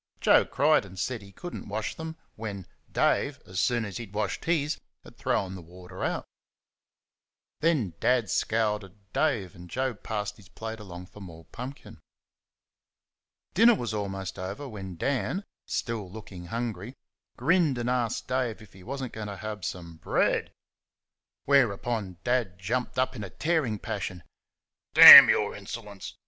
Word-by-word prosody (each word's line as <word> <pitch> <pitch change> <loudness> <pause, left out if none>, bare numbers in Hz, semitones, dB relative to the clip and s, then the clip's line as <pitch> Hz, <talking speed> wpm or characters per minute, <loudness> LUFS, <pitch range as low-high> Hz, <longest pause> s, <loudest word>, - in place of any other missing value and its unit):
Joe - - +5
cried 150 -1 +3
and 95 -2 -12
said 120 +5 -2
that - - -13
he - - -15
could 175 - -9
n't - - -7
wash 105 +2 -3
them 160 0 -7 0.2
when 100 -4 -6 0.3
Dave, - - +1
as 95 0 -5
soon 120 +2 +1
as 100 -3 -6
he 120 - -6
had 100 - -17
washed 105 -1 -2
his, 155 -3 0 0.2
had - - -15
thrown 95 -1 -1
the 95 - -8
water 90 +2 -10
out. - - -2 1.3
Then 145 - +1
Dad 125 -3 +2
scowled 105 +1 0
at 100 +1 -18
Dave, 115 - 0
and 90 0 -13
Joe 130 +3 -1
passed 105 -1 -5
his 95 -5 -18
plate 110 +3 -7
along 90 -3 -9
for 105 - -15
more 85 -3 -11
pumpkin. 125 - -9 1.5
Dinner 230 +4 +6
was 120 - -4
almost 95 -3 -4
over 100 +10 -5
when 95 -6 -8
Dan, 135 - -1 0.2
still 110 -5 -3
looking 95 -4 -10
hungry, 115 +2 -4 0.4
grinned 160 0 +2
and 120 0 -3
asked 125 -3 -1
Dave 125 -4 -1
if 105 -3 -16
he 95 - -15
was 135 +7 -5
n't 125 - -6
going 110 -1 -6
to 100 -1 -6
have 105 -2 -6
some 85 -3 -6
BREAD? - - 0 0.9
Whereupon 115 -7 +1
Dad 120 -7 0
jumped 120 +8 -3
up 130 +1 0
in 105 - -6
a 100 - -6
tearing 150 - 0
passion. 90 -4 -5 0.7
"D - - +5
n - - +14
your - - +1
insolence!" 105 -4 -8
110 Hz, 165 wpm, -27 LUFS, 95-125 Hz, 1.5 s, n